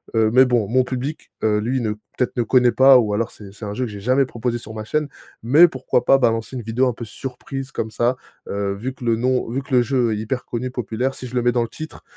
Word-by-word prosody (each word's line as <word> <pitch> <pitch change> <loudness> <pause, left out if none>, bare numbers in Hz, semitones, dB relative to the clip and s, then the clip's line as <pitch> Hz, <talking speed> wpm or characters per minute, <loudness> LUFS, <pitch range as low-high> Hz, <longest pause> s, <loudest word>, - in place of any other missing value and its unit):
heu, 110 -1 +4
mais 130 +1 +7
bon 120 -5 +1
mon 125 +4 +3
public, 130 +5 -5
heu, 105 -1 +2
lui 125 +5 -1
ne 110 -2 -1
peut-être 110 +4 -4
ne 120 - +1
connaît 125 +1 +4
pas» 130 +1 +7
ou 105 -3 0
alors, 115 +3 0
c'est 100 -2 -12
c'est 105 +1 -9
un 100 - -4
jeu 125 +2 -1
que 110 - -7
j'ai 100 - -8
jamais 130 +5 +3
proposé 120 -1 -3
sur 115 -2 -10
ma 110 -1 -5
chaîne, 150 +4 -1 0.4
mais 150 +9 +7
pourquoi 130 -2 -1
pas 135 - +6
balancer 115 -1 0
une 120 - -5
vidéo 115 +4 +1
un 125 - 0
peu 115 - -7
surprise 135 +4 -7
comme 110 - -4
ça, 120 +3 +1 0.3
heu, 100 0 -1
vu 120 +7 -5
que 125 - -10
le 115 -1 +3
nom 125 +2 0
vu 135 +3 -1
que 135 - -9
le 125 - +6
jeu 120 -2 +1
est - - -2
hyper 110 +4 -3
connu, 125 +2 -4
populaire, 125 +1 -2
si 130 - -7
je 125 - -9
le 125 - +2
mets 120 - +3
dans 120 -1 +2
le 115 - -5
titre, 155 0 -9
120 Hz, 275 wpm, -21 LUFS, 110-130 Hz, 0.4 s, mais